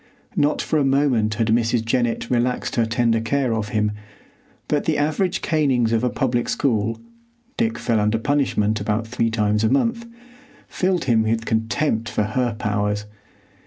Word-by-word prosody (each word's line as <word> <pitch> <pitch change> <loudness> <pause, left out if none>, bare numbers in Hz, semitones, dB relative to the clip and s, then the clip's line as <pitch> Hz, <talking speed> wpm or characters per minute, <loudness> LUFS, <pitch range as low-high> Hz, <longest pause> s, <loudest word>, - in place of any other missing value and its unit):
Not 145 +1 +1
for 155 - 0
a - - +2
moment 135 -6 +2
had 115 0 0
Mrs. 115 0 +1
Jennett 120 -1 0
relaxed 125 +1 0
her 115 -2 +2
tender 115 0 +1
care 130 +1 0
of 110 -2 -2
him, 105 0 0 0.8
but - - 0
the - - +1
average 155 +5 0
canings 135 -8 +1
of 115 +1 +1
a 125 - +2
public 120 -2 -1
school—Dick 235 - -3
fell 115 -2 0
under 105 +2 +1
punishment 110 -5 0
about 105 +2 -1
three 115 0 -1
times 105 -1 +1
a 110 - +3
month—filled 235 - -3
him 120 -4 +3
with 115 +1 -1
contempt 115 +1 0
for 105 - 0
her 120 +2 -1
powers. 105 -1 -1
120 Hz, 155 wpm, -22 LUFS, 110-145 Hz, 0.8 s, a